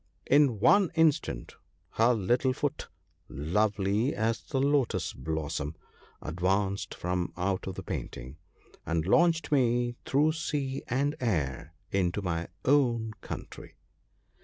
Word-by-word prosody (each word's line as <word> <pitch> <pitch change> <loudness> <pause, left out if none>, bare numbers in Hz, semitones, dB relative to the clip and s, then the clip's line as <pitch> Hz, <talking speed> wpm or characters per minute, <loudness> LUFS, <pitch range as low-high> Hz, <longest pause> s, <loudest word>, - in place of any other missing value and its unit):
In 140 -6 +4
one 195 - +5
instant 155 - +1 0.3
her 115 +2 +3
little 120 +5 +1
foot, 145 +2 -3 0.4
lovely 100 - 0
as 110 +2 0
the 135 - -3
lotus 140 -2 +1
blossom, 75 +1 -3 0.5
advanced 95 +5 -1
from 90 0 -2
out 95 +1 -1
of 95 - -4
the - - -6
painting, 65 +5 -6 0.5
and 85 -1 -1
launched 165 - +3
me 120 -3 +2
through 150 +3 +3
sea 145 -5 -2
and 140 +4 0
air 80 - -2 0.2
into 95 +1 0
my 85 -2 -2 0.2
own 120 -6 +2
country. - - -8
110 Hz, 115 wpm, -29 LUFS, 90-135 Hz, 0.5 s, one